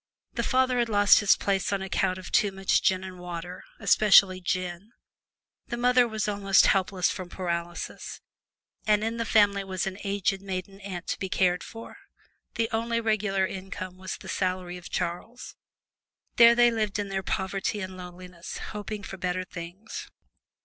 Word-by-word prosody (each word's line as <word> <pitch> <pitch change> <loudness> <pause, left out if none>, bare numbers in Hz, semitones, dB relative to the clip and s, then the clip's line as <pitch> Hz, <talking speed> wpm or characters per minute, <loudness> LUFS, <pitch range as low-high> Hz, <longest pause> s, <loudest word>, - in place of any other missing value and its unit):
The - - -1
father 255 -1 +2
had 235 -1 +1
lost 205 -1 +6
his 205 - +5
place 195 -1 0
on 195 -1 -1
account 190 0 0
of 185 - -9
too 205 - +3
much 195 0 +1
gin 185 0 +2
and 185 -1 -8
water, 180 0 -7 0.2
especially 195 -3 +5
gin; 185 +4 -3 0.7
the 240 - -4
mother 245 0 +4
was 220 -2 -2
almost 200 -2 +4
helpless 190 -1 +2
from 185 -2 -6
paralysis, 175 -2 -4 0.7
and 210 0 +3
in 225 +1 -2
the 230 - -1
family 205 -2 +3
was 190 -2 -3
an 195 0 -5
aged 195 -1 0
maiden 195 0 -5
aunt 185 -3 -6
to - - -2
be 190 - -3
cared 180 -1 +1
for. 230 +10 -10 0.6
The 230 -1 +1
only 230 +1 0
regular 215 -4 +1
income 185 -1 -6
was 185 -1 -5
the - - -12
salary 185 -1 -2
of 180 - -10
Charles. 180 +8 -4 0.8
There 235 0 +8
they 240 0 +5
lived 215 -3 -1
in 205 -1 -3
their 195 0 -2
poverty 190 +2 -2
and 185 -1 -6
lowliness, 180 -1 -9 0.2
hoping 210 0 -5
for 195 - -7
better 180 0 -2
things! 180 +4 -8
195 Hz, 165 wpm, -27 LUFS, 185-215 Hz, 0.8 s, There